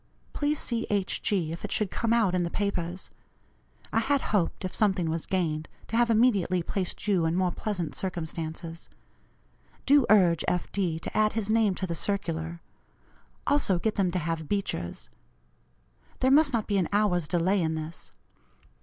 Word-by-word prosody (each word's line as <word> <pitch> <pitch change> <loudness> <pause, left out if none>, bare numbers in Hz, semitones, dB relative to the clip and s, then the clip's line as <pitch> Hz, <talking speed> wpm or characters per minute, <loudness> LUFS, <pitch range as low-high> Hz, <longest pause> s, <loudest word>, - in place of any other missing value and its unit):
Please 295 +1 0
see 235 -2 -2
H. 200 -2 -1
G., 180 -6 0
if 165 - -7
it 210 - -4
should 210 -4 0
come 230 -1 -1
out 225 -6 +3
in 180 - +2
the 170 - -1
papers. 185 -2 -3 0.8
I 225 - +4
had 280 +5 +2
hoped, 190 -1 0
if 185 - -4
something 190 -6 +1
was 165 0 -3
gained, 155 -5 -1 0.2
to 225 - -3
have 240 0 +3
immediately 205 -6 +3
placed 190 +3 -3
you 180 -5 +3
in 165 - 0
more 185 -1 +1
pleasant 180 -4 -3
circumstances. 165 -2 -5 1.0
Do 280 -2 +5
urge 180 -6 +5
F. 180 - -1
D. 180 -5 -1
to - - -7
add 215 0 +3
his 215 -2 -1
name 220 -4 +3
to 190 - -3
the 170 - -3
circular; 170 -2 -3 0.8
also 280 -11 +3
get 215 +5 0
them 195 -3 +1
to 180 - -2
have 165 -2 -3
Beecher's. 85 - -3 1.1
There 260 - +3
must 290 +1 +5
not 230 -4 0
be 200 -2 +1
an 175 - 0
hour's 200 -6 +2
delay 180 +3 +2
in 160 -1 0
this. 160 +1 -6
185 Hz, 170 wpm, -28 LUFS, 170-215 Hz, 1.1 s, Do